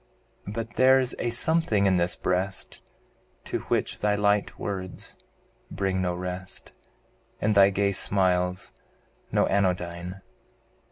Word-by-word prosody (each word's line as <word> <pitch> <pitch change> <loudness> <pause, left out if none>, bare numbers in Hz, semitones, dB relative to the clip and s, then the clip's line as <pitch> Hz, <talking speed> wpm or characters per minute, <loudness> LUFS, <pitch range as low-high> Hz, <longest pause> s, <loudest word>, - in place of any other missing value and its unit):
But 105 +1 -5
there's 130 0 +4
a 120 - 0
something 120 -4 +2
in 95 -2 +3
this 85 +1 +1
breast, 95 +1 -2 0.6
To - - -3
which - - -1
thy 105 0 +1
light 105 0 +1
words 95 -2 -5 0.5
bring 95 0 -1
no 90 -1 -1
rest. 90 0 -6 0.7
And 105 +1 +1
thy 100 -1 +7
gay 100 0 +1
smiles 90 -2 +1 0.6
no - - +3
anodyne. 90 -1 -1
95 Hz, 115 wpm, -26 LUFS, 90-105 Hz, 0.7 s, thy